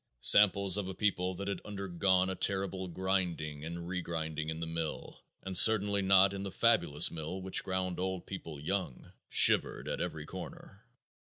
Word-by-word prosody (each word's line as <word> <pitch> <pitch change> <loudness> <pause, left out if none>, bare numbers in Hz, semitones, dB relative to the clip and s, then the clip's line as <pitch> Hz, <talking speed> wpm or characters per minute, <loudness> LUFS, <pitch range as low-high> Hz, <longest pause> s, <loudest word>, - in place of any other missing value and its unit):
Samples 100 -1 +5
of 100 -2 -3
a 95 - -7
people 95 -3 -1
that 100 +2 -6
had 100 - -4
undergone 95 -2 0
a - - -2
terrible 95 0 -2
grinding 90 -5 -3
and 85 +1 -6
regrinding 80 -3 -4
in 80 0 -5
the 85 - -4
mill, 80 -1 -5 0.2
and 95 -1 -6
certainly 100 0 +5
not 95 0 +4
in 100 - -5
the 100 - -5
fabulous 75 -2 +2
mill 80 +3 -6
which 95 0 -2
ground 95 -1 -2
old 95 -1 -3
people 80 -6 -8
young, 85 -3 -4 0.2
shivered - - +4
at - - -3
every 75 -1 -5
corner.... 100 +8 -11
95 Hz, 165 wpm, -31 LUFS, 85-95 Hz, 0.2 s, Samples